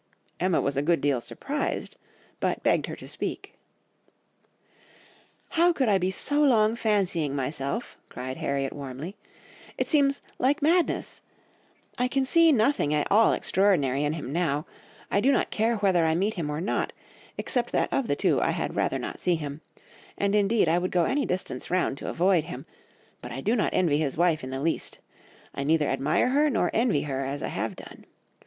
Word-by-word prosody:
"Emma 180 -1 +2
was 140 - -1
a 140 - +1
good 165 +3 +2
deal 140 -4 +1
surprised, 285 - -4 0.4
but - - -1
begged - - +2
her - - -5
to - - -11
speak.... - - -4 2.0
"'How 345 +1 +4
could 265 -8 0
I 195 -2 +4
be 185 +1 0
so 290 +10 0
long 225 -6 +4
fancying 185 -10 0
myself—,' 140 - -3
cried 130 +1 -6
Harriet 140 -1 -2
warmly. 140 +6 -7 0.6
'It - - -1
seems 280 -3 +2 0.2
like 280 +3 +1
madness! 335 +3 +1 0.8
I 250 - +2
can 270 +1 0
see 330 +3 +5
nothing 220 - +2
at 150 - -1
all 220 +3 +6
extraordinary 150 -9 +2
in 150 +1 0
him 145 -4 -5
now, 155 -3 0 0.5
I 200 - +2
do 270 - +4
not - - +1
care 225 +2 +1
whether 190 -5 +2
I 160 0 +2
meet 200 +5 0
him 165 -7 -3
or 150 +1 -3
not, 190 - -1 0.4
except 240 -1 -1
that - - 0
of 270 - 0
the - - +1
two - - +1
I - - +1
had - - -2
rather - - 0
not - - -6
see 180 - +1
him; 150 -1 -6 0.6
and 200 0 0
indeed 210 -1 +3
I 165 +2 +3
would 185 +1 -2
go 175 -2 +2
any 280 +1 0
distance 180 +1 -4
round 175 -6 0
to - - -5
avoid 175 -2 +2
him, - - -8 0.6
but 125 - -8
I 125 - -5
do 215 - +1
not 215 - +1
envy 155 -5 +2
his 145 -3 -1
wife 170 -3 +2
in 130 - -5
the 135 +1 -4
least; 165 +2 -2 0.6
I 140 - -3
neither 155 0 +2
admire 140 - +1
her 295 +3 +3
nor 270 - +1
envy 225 - +2
her 135 -2 -3
as 140 +2 -4
I - - -2
have - - -3
done. - - -12
180 Hz, 190 wpm, -26 LUFS, 145-230 Hz, 2.0 s, all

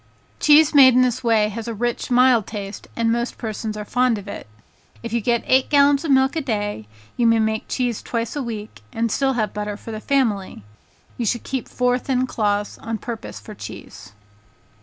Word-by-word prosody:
Cheese 300 +1 +6
made 260 -3 +8
in 255 - +5
this 255 0 -1
way 220 -3 +3
has 225 +2 -6
a 230 - -4
rich, 240 +2 -2
mild 250 -3 +4
taste, 200 -2 -7
and 230 -1 +1
most 235 +1 -2
persons 215 -1 -4
are 210 - -5
fond 250 0 +1
of 200 0 -9
it. 200 - -7 0.6
If 230 -1 -5
you 235 - +1
get 235 +2 +1
eight 260 0 +3
gallons 285 0 +4
of 325 - -3
milk 265 +2 +3
a 320 - 0
day, 205 - -3 0.3
you 235 - +3
may 230 0 +4
make 220 0 -1
cheese 245 -4 -2
twice 230 +1 -3
a 290 - -2
week, 215 - -7
and 230 0 -1
still 270 +2 +1
have 215 -4 -1
butter 210 0 -4
for 225 - -9
the 215 - -5
family. 215 - -1 0.6
You 235 - -1
should 240 +3 -1
keep 265 -2 -4
four 250 0 +1
thin 255 0 0
cloths 205 -4 -1
on 225 0 -4
purpose 230 +1 -7
for 215 - -11
cheese. 105 - -10
230 Hz, 200 wpm, -21 LUFS, 215-255 Hz, 0.6 s, made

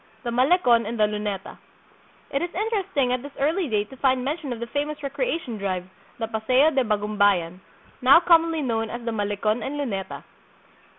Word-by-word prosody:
The 240 - -3
Malecon 245 - +3
and 230 0 -4
the - - +5
Lunetcu. 210 -2 -2 0.8
It 275 - 0
is 350 - -2
interesting 385 - 0
at 250 - -1
this 285 +1 -10
early 320 +5 +1
date 210 0 -1
to 265 - -11
find 260 -1 +1
mention 290 -1 -3
of 240 - -4
the 235 - -3
famous 290 +4 -3
recreation 280 - -3
drive, 185 -2 -2 0.3
the 230 - -2
Paseo 250 +7 +2
de 270 -3 +2
Bagumbayan, 205 -5 +1 0.4
now 260 +5 +8
commonly 330 -2 +3
known 225 -3 -1
as 240 0 -6
the 230 - -1
Malecon 210 +1 -1
and 290 +2 -4
Luneta. 200 -10 -4
245 Hz, 175 wpm, -24 LUFS, 215-290 Hz, 0.8 s, now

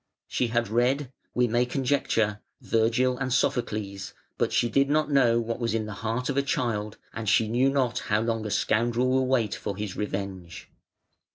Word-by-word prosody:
She 125 - 0
had 120 0 0
read 125 +5 +1 0.2
(we 125 0 +3
may 120 +2 +2
conjecture) 125 -5 0 0.2
Virgil 120 +3 +1
and 135 -1 -2
Sophocles, 105 -6 -1 0.2
but - - +1
she 120 - +2
did 140 +4 +2
not 150 0 +1
know 120 -4 +4
what 115 +1 -3
was 115 -2 -1
in 110 -1 -1
the 105 - -6
heart 115 +3 -2
of 140 - -2
a - - +5
child, 110 -6 -2 0.2
and 115 -2 -3
she 110 - +4
knew 125 +5 +2
not 130 -3 0
how 105 0 +3
long 115 -1 -1
a - - -4
scoundrel 120 +4 +1
will 130 0 +2
wait 125 -5 +1
for 100 -2 -5
his 105 -2 -4
revenge. 95 -4 -5
115 Hz, 185 wpm, -26 LUFS, 110-130 Hz, 0.2 s, a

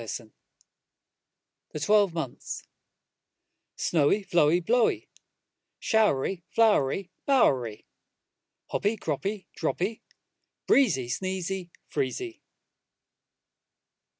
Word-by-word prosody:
Y 115 - -8
Z 110 0 -6 1.4
The 155 - -4
Twelve 205 +4 +4
Months 160 -7 -5 1.1
SNOWY, 165 +6 +2
Flowy, 170 -1 +4
Blowy, 240 +1 +2 0.7
Showery, 195 - +1
Flowery, 195 -5 +2 0.2
Bowery, 130 - +2 0.9
Hoppy, 210 +2 0
Croppy, 195 +5 -3
Droppy, 205 +5 -2 0.6
Breezy, 195 - +3
Sneezy, 185 +5 -3 0.2
Freezy. 155 - -3
185 Hz, 70 wpm, -27 LUFS, 145-210 Hz, 1.4 s, Twelve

